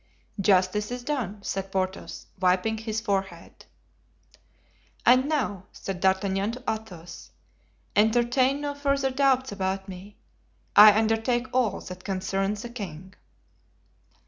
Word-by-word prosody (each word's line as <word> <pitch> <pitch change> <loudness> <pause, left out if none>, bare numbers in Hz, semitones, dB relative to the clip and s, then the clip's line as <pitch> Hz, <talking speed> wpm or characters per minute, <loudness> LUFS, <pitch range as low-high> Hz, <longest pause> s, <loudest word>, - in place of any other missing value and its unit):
"Justice 195 +2 +2
is 245 0 -5
done," 230 -8 -3
said 195 -1 -4
Porthos, 190 0 -3
wiping 185 +4 +1
his 220 0 -3
forehead. 195 -3 -4 1.4
"And 255 +4 +5
now," 205 - -1
said 190 -2 -6
D'Artagnan 195 +2 +1
to 250 +1 -9
Athos, 185 -7 -6 0.7
"entertain 240 +5 +3
no 290 -1 -2
further 275 -1 0
doubts 265 -1 +2
about 190 0 -3
me; 195 +2 -10 0.6
I 210 0 +9
undertake 225 +3 +1
all 245 -6 +1
that 185 0 -9
concerns 195 +2 -2
the 240 - -6
king." 190 -6 -8
210 Hz, 115 wpm, -26 LUFS, 190-245 Hz, 1.4 s, I